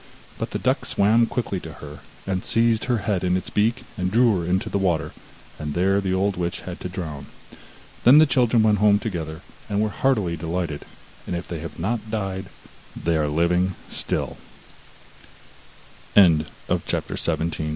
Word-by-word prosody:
But - - -2
the - - -3
duck - - 0
swam 110 +4 +3
quickly 115 -6 -2
to 80 -3 -9
her, 75 0 -10 0.4
seized 115 0 +2
her 125 -2 +1
head 100 -4 0
in 90 0 +2
its 95 - -5
beak 115 +4 +1
and 90 -1 0
drew 115 -2 +4
her 85 - -4
into 95 +1 +1
the 100 - -1
water, 80 -5 0 0.5
and 75 -1 -4
there 95 +3 +2
the 95 -1 -1
old 95 +1 +1
witch 85 -1 -2
had 90 -1 -7
to 90 - -5
drown. 80 -6 -6 0.8
Then 130 +5 +8
the 155 - +8
children 120 -5 +3
went 105 -2 +3
home 105 0 +5
together, 85 -7 -4 0.3
and 100 -1 0
were 110 0 +1
heartily 105 -8 +1
delighted, 80 -1 -3 0.4
and 90 - -2
if 85 - -5
they 85 - -5
have 85 +2 -8
not 110 +5 -2
died, 95 -3 -3 0.5
they 85 0 0
95 Hz, 150 wpm, -23 LUFS, 85-110 Hz, 0.8 s, Then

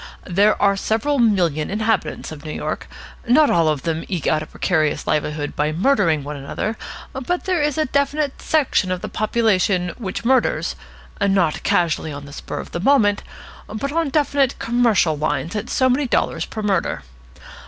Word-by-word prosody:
There 200 +4 +3
are 200 -1 +3
several 230 +8 0
million 175 -10 +2
inhabitants 215 -3 -1
of 150 -2 -9
New 155 - -6
York. - - -4 0.4
Not 290 +5 +5
all 165 -2 +3
of 150 -3 -1
them 165 -1 -2
eke 180 -7 -3
out 155 - +2
a 155 - -7
precarious 155 -5 0
livelihood 150 -1 -1
by 150 +1 0
murdering 165 - +2
one 150 +1 -5
another, 145 +10 -4 0.4
but 275 +7 -2
there 365 -4 0
is 295 -1 0
a 310 - +2
definite 280 +1 -1
section 275 -11 +1
of 180 -1 -2
the - - -4
population 200 -5 +1
which 200 0 -5
murders 260 0 +2 0.5
not 195 -5 +2
casually, 165 -2 +1
on 140 0 -7
the 140 - -11
spur - - -6
of - - -7
the - - -3
moment, 205 -2 +3 0.5
but 215 +7 -4
on 325 -1 0
definitely 280 -2 +1
commercial 230 -9 +2
lines 155 +4 -2
at 210 +2 -3
so 260 - +2
many 260 +2 +1
dollars - - 0
per 215 - -6
murder. 195 - 0
205 Hz, 175 wpm, -21 LUFS, 160-260 Hz, 0.5 s, Not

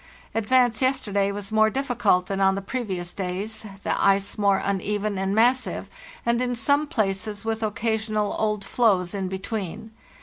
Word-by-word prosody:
" - - -27
Advance 245 +1 +3
yesterday 205 -7 +1
was 200 0 -6
more 220 0 +4
difficult 240 -8 +1
than 195 +1 -2
on 195 0 +4
the 195 - -3
previous 195 -7 -3
days, 200 +4 -4 0.2
the - - 0
ice 195 0 +3
more 200 -2 +3
uneven 200 +1 -1
and 195 +1 0
massive, 250 +3 +2 0.3
and 235 +1 +2
in 245 -1 0
some 285 +6 +2
places 210 - -2
with 225 0 -1
occasional 215 -1 -1
old 210 -2 0
floes 195 -7 +2
in 195 -2 -2
between. 195 +2 -5
210 Hz, 160 wpm, -25 LUFS, 195-230 Hz, 0.3 s, more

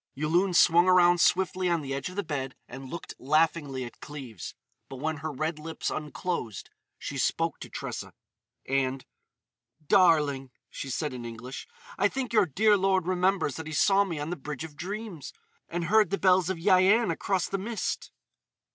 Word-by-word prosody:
Yulun 170 +7 +1
swung 175 0 +5
around 175 -1 +5
swiftly 185 0 +2
on 170 -2 +1
the 135 -1 -4
edge 140 +5 -3
of 180 - -10
the 205 - -1
bed 135 -4 -4
and 130 +1 -9
looked 170 - -7
laughingly 145 -2 +1
at 120 - -11
Cleves. 130 - -8 0.3
But - - -7
when 155 +4 -2
her 155 +2 -4
red 155 +3 -3
lips 160 +1 -4
unclosed 150 - -4 0.3
she 140 - -5
spoke 165 +5 0
to - - -9
Tressa: - - -6 0.5
and, 135 0 -1 0.8
"Darling," 150 -7 +3 0.2
she 135 - -6
said 145 +2 -2
in 125 -1 -6
English, 120 +3 -8 0.3
"I 200 - +5
think 255 +1 -4
your 210 -4 +4
dear 210 +8 +4
lord 190 -2 +2
remembers 185 -5 +1
that 160 -1 -6
he 155 - -6
saw 195 +6 +4
me 175 -5 -4
on 150 +3 -4
the - - -1
Bridge 150 -1 -6
of 160 -2 -9
Dreams. 190 -1 -6 0.4
And 175 0 -2
heard 215 +5 +4
the 200 - 0
bells 185 -2 +3
of 190 - -1
Yian 190 +4 +4
across 185 +2 -1
the 195 - -2
mist." 220 +3 -3
165 Hz, 175 wpm, -28 LUFS, 140-185 Hz, 0.8 s, swung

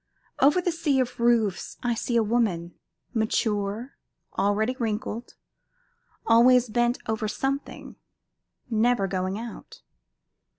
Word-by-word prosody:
Over 295 +6 +5
the 355 - +1
sea 310 -5 +1
of 250 -2 -2
roofs 230 -5 +1
I 240 -1 +1
see 235 +1 -2
a 230 - +4
woman, 205 -7 0 0.4
mature, 220 +1 -1 0.4
already 215 +5 +1
wrinkled, 230 +1 -3 0.9
always 240 +1 +5
bent 240 +2 +1
over 220 0 -2
something, 270 +6 -4 0.7
never 235 -2 +2
going 185 0 -2
out. 225 - -9
230 Hz, 110 wpm, -26 LUFS, 210-245 Hz, 0.9 s, Over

